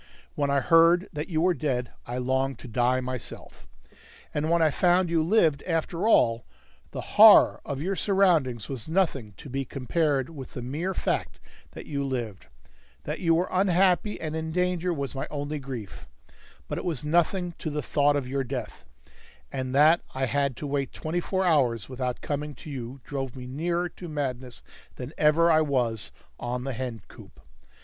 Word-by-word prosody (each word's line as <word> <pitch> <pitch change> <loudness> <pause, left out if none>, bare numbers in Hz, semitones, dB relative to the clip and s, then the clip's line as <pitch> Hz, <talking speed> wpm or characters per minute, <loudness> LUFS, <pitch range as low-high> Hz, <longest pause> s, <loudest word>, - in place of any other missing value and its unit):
When 145 -1 -1
I 140 0 +2
heard 165 +4 +5
that 150 0 -4
you 160 -2 0
were 180 +1 +3
dead, 125 -5 -2 0.2
I 120 +1 -4
longed 130 +1 0
to - - -11
die 125 +2 +1
myself. 130 -1 -7 0.7
And 150 +2 -1
when 170 0 +3
I 160 -2 +4
found 175 +2 +2
you 165 -1 +3
lived 160 -5 +3
after 165 +3 -1
all, 115 - +4 0.5
the - - -5 0.2
horror - - +8
of 140 +1 -4
your 195 +3 -1
surroundings 165 - +2
was 130 0 -6
nothing 155 - 0
to - - -11
be 135 +1 -2
compared 135 +1 0
with 135 -5 -10
the 125 - -5
mere 160 +9 -3
fact - - -2 0.3
that - - -9
you 140 -1 -3
lived; 120 - -4 0.6
that - - -4
you 165 -2 +3
were 175 +3 +1
unhappy 185 +2 +2
and 155 -1 -4
in 160 0 -3
danger 180 0 0
was 140 -5 -3
my 135 - -4
only 145 +1 -4
grief, 125 -8 -8 0.6
but - - -3
it - - -6
was 155 -5 -3
nothing 175 +3 +1
to - - -3
the 150 -1 -3
thought 145 +3 +2
of 140 -3 -2
your 135 +1 -1
death; 130 0 -6 0.7
and 130 0 -3
that 155 +4 +6
I 130 0 0
had 140 0 0
to - - -5
wait 140 -1 -2
twenty 160 +3 -2
four 190 +2 -1
hours 130 - +2
without 125 -1 -3
coming 145 0 -3
to 150 - -10
you 130 0 -7
drove 135 -3 -5
me 125 -1 -8
nearer 170 +7 -1
to 175 0 -10
madness 130 -4 -4 0.3
than 125 +4 -7
ever 160 +3 +4
I 160 0 +5
was 125 -7 0 0.3
on 125 +1 -3
the 135 0 -3
hen 120 -4 -5
coop. - - -15
145 Hz, 180 wpm, -27 LUFS, 130-165 Hz, 0.7 s, horror